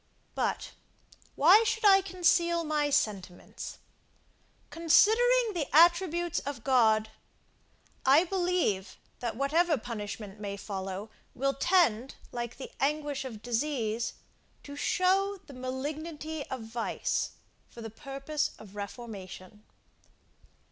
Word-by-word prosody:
But, - - -2 0.6
why 370 +10 +7
should 445 -1 -1
I 390 -1 +7
conceal 345 -2 +2
my 300 -2 0
sentiments? 195 -9 -2 0.9
Considering 445 +8 +4
the 320 -6 -2
attributes 345 +1 +4
of 275 -5 -6
God, 220 -5 +3 0.9
I 280 +5 +6
believe, 355 - -1 0.2
that 235 -2 -3
whatever 310 +5 +2
punishment 210 -3 -6
may 200 -1 -5
follow, 195 +1 -5 0.2
will 275 +2 0
tend, 275 - +2 0.2
like 240 -1 -5
the 270 - -8
anguish 290 -1 -1
of 220 -5 -8
disease, 235 -2 -1 0.5
to 285 - -9
show 385 +5 +1
the 280 - -12
malignity 295 +4 -5
of 260 -2 -5
vice, 225 +1 -2 0.4
for 235 - -11
the 225 - -7
purpose 275 +5 -3
of 205 -2 -14
reformation. 205 -2 -8
275 Hz, 105 wpm, -29 LUFS, 225-340 Hz, 0.9 s, why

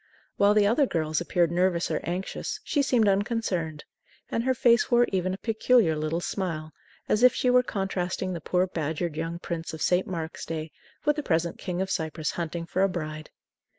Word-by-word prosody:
While 205 +1 +4
the 210 -1 +5
other 245 +7 +3
girls 155 -3 -1
appeared 175 -1 +1
nervous 175 0 +1
or - - 0
anxious, 180 +2 -4
she 290 - +1
seemed 245 -5 +3
unconcerned, 195 -6 0 0.5
and 230 - 0
her 260 +1 +1
face 235 0 +4
wore 240 0 +5
even 185 -1 0
a 190 - -3
peculiar 225 -5 +3
little 155 +2 -1
smile, 165 -5 -3 0.4
as 215 - +2
if 250 0 +6
she 250 - +2
were 250 0 +6
contrasting 190 -4 -2
the 170 - -5
poor 180 +4 +1
badgered 160 -1 -3
young 165 +2 -3
prince 170 -1 -5
of 155 - -10
St. 180 +1 +2
Mark's 165 -3 -5
Day 160 -1 -4 0.3
with 295 0 +3
the - - 0
present 170 - 0
King 180 0 -2
of 190 - -5
Cyprus 160 -3 -2
hunting 170 0 -4
for 185 +2 -1
a 195 - +4
bride. 155 -3 -5
180 Hz, 190 wpm, -27 LUFS, 165-210 Hz, 0.5 s, if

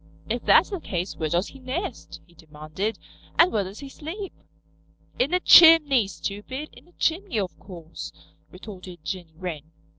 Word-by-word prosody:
"If - - -2
that's - - +5
the 385 - -3
case 180 - -4
where 155 - -2
does 175 +5 0
he 270 - -14
nest?" 265 +10 -5
he 175 - -24
demanded. 160 +6 -5 0.4
"And 345 +2 +6
where 210 - +1
does 195 +6 -9
he 280 - -8
sleep?" 350 +8 -7 0.9
"In 260 +4 +2
a 360 - +3
chimney, 305 - +7
stupid. 205 - -6
In - - -17
a - - -22
chimney, 340 - -1
of 190 -3 -3
course," 170 -4 -9 0.4
retorted 180 -3 -11
Jenny 175 -4 -6
Wren. 160 -4 -6
200 Hz, 160 wpm, -25 LUFS, -, 0.9 s, chimney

